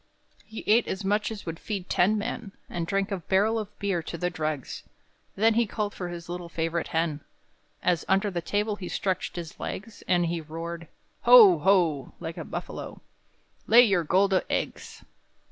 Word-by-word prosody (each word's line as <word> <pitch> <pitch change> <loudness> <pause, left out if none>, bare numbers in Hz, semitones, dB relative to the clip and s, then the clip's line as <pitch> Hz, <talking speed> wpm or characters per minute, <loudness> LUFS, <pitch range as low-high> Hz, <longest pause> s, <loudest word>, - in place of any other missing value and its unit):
He 220 - -8
ate 225 +3 +4
as 190 +1 -4
much 210 +2 +1
as 220 -2 -7
would 165 -1 -5
feed 195 -4 -4
ten 205 +5 +3
men, 205 -1 -4
And 170 -1 -4
drank 195 +1 -1
a 195 - 0
barrel 200 +6 +2
of 210 -1 -8
beer 195 -4 -1
to 170 - -6
the 180 +2 -1
dregs; 155 -5 -4 0.5
Then 220 +3 +4
he 235 0 +2
called 210 -1 -3
for 180 -2 -5
his 170 -1 -7
little 175 0 -6
favorite 165 0 -2
hen, 160 -2 -1 0.6
As 175 -4 +2
under 195 +2 +2
the 175 -2 -2
table 205 +4 -1
he 180 -3 -6
stretched 185 -2 -2
his 170 -2 -7
legs, 210 +2 -6
And 175 -1 +3
he 170 0 -2
roared 165 +2 -7 0.4
"Ho! 430 -8 +9
ho!" 175 -8 +2
like 160 0 -6
a - - -4
buffalo - - -7 0.7
"Lay 240 +2 +8
your 195 -7 +2
gold 190 +5 +3 0.2
eggs!" - - -4
185 Hz, 180 wpm, -27 LUFS, 170-210 Hz, 0.7 s, Ho